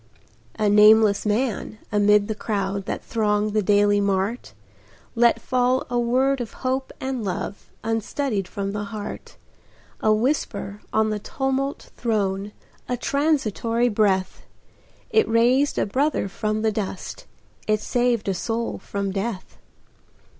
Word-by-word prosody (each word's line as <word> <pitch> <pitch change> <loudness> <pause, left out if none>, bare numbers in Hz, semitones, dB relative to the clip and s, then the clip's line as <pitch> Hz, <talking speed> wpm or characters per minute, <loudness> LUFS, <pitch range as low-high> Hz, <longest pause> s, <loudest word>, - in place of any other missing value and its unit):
A 215 -1 +1
nameless 210 0 +6
man, 215 0 -1
amid 210 0 +4
the 220 - -1
crowd 200 -2 -2
That - - -4
thronged 210 -2 0
the 215 - +2
daily 205 0 +3
mart, 200 - -1 0.6
Let 235 0 +4
fall 255 +1 +1
a 245 - +1
word 260 +3 +2
of 235 - -6
hope 260 +1 -1
and 260 -3 -3
love, 195 +1 -4
Unstudied 225 -1 -1
from 195 +1 -4
the 205 0 -3
heart, 205 0 -7 0.6
A 215 - +2
whisper 215 -3 -1
on 220 0 +2
the 210 - -2
tumult 270 +4 -2
thrown, 205 -3 -1 0.4
A 250 - 0
transitory 245 -5 +1
breath, 200 -4 +1 0.7
It 440 - +3
raised 245 +5 +3
a - - +2
brother 270 +2 0
from 215 +2 -2
the 220 - +2
dust, 210 - -5 0.4
It 215 0 +2
saved 240 -1 0
a 195 - +1
soul 225 +6 -3
from 200 -1 -3
death. 195 0 -4
215 Hz, 130 wpm, -23 LUFS, 205-245 Hz, 0.7 s, nameless